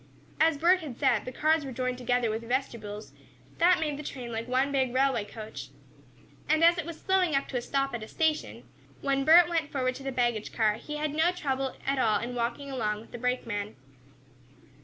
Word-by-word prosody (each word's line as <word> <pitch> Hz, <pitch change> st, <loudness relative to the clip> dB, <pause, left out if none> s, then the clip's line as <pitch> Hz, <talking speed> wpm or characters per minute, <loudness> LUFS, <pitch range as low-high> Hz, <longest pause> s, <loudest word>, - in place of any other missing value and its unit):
As 320 Hz, -1 st, +4 dB
Bert 350 Hz, +5 st, +4 dB
had 285 Hz, -8 st, -8 dB
said, 225 Hz, -4 st, +2 dB
the 255 Hz, -, -5 dB
cars 310 Hz, +3 st, +2 dB
were 270 Hz, -, -6 dB
joined 255 Hz, 0 st, -2 dB
together 245 Hz, -2 st, +1 dB
with 220 Hz, +1 st, -3 dB
"vestibules," 230 Hz, -4 st, -4 dB, 0.5 s
that 350 Hz, +2 st, +5 dB
made 300 Hz, -3 st, -2 dB
the -, -, -6 dB
train 250 Hz, -4 st, -6 dB
like 225 Hz, +1 st, -4 dB
one 260 Hz, +3 st, +1 dB
big 265 Hz, -3 st, +1 dB
railway 265 Hz, -4 st, +2 dB
coach. 215 Hz, +1 st, -8 dB, 0.8 s
And 315 Hz, +1 st, +3 dB
as 340 Hz, +1 st, +6 dB
it 330 Hz, -, -4 dB
was 335 Hz, -2 st, -7 dB
slowing 370 Hz, -5 st, +2 dB
up 275 Hz, -, 0 dB
to 250 Hz, -3 st, -2 dB
stop 275 Hz, +2 st, -1 dB
at 235 Hz, -, -3 dB
a 215 Hz, -, -7 dB
station, 315 Hz, +2 st, -1 dB, 0.4 s
when 275 Hz, -1 st, 0 dB
Bert 335 Hz, +2 st, +8 dB
went 325 Hz, -3 st, -1 dB
forward 255 Hz, -2 st, 0 dB
to 265 Hz, -, -10 dB
the 270 Hz, -, -3 dB
baggage 240 Hz, -4 st, 0 dB
car, 215 Hz, -2 st, +2 dB
he 300 Hz, +6 st, -7 dB
had 300 Hz, -1 st, -2 dB
no 320 Hz, +3 st, +3 dB
trouble 270 Hz, -6 st, -2 dB
at 275 Hz, 0 st, 0 dB
all 215 Hz, -4 st, +3 dB
in 240 Hz, +3 st, -5 dB
walking 245 Hz, +4 st, -3 dB
along 215 Hz, -5 st, -1 dB
with 225 Hz, -, -15 dB
the 240 Hz, -, -7 dB
brake 250 Hz, +1 st, -1 dB
man. 205 Hz, -2 st, -4 dB
265 Hz, 210 wpm, -28 LUFS, 235-300 Hz, 0.8 s, Bert